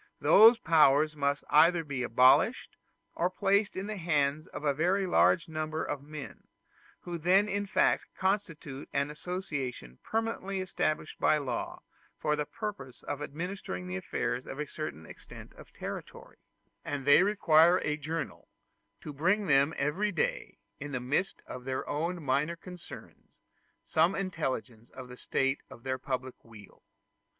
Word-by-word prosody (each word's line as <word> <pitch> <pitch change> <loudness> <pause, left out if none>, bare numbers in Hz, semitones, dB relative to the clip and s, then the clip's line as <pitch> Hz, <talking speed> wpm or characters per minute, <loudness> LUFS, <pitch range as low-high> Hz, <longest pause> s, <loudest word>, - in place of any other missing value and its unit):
Those 225 +3 +7
powers 155 - +4
must 140 0 0
either 165 +2 +5
be 140 -4 -4
abolished, 125 +2 +3 0.4
or 175 - 0
placed 195 +2 +1
in 190 - -4
the 215 0 -5
hands 155 -3 0
of - - -8
very 185 +6 +1
large 180 -1 +3
numbers 155 0 -3
of 145 - -3
men, 150 0 -10 0.5
who 175 -1 -6
then 190 +5 +4
in 205 0 -2
fact - - +2
constitute 175 -8 -2
an 140 +1 0
association 145 - -5
permanently 220 -4 -2
established 155 -4 -2
by 155 - +4
law 140 -4 -4 0.3
for 150 0 0
the 150 -1 -3
purpose 210 - -7
of 145 - -5
administering 150 - -5
the 90 0 -5
affairs 120 +6 -3
of 135 - -7
a 150 - -2
certain 140 - -6
extent - - -12
of - - -15
territory; - - -8 0.5
and 140 -2 -4
they 145 +4 +7
require 175 -4 +5
a 150 - -1
journal, 155 +2 -5 0.5
to 150 - -7
bring 180 +9 +2
to 190 -8 +1
them 140 +2 +4
every 170 +9 0
day, 170 - -2 0.2
in 145 0 -7
the 125 - -1
midst 145 +10 -2
of 125 - -8
their 130 0 -3
own 170 +3 -2
minor 145 +5 0
concerns, 180 0 -12 0.5
some 165 +4 +2
intelligence 130 - -4
of 130 -1 -9
the 125 - -9
state 135 +2 -1
of 115 - -13
their 130 0 -2
public 130 -1 -5
weal. 110 -4 -15
155 Hz, 150 wpm, -30 LUFS, 135-180 Hz, 0.5 s, Those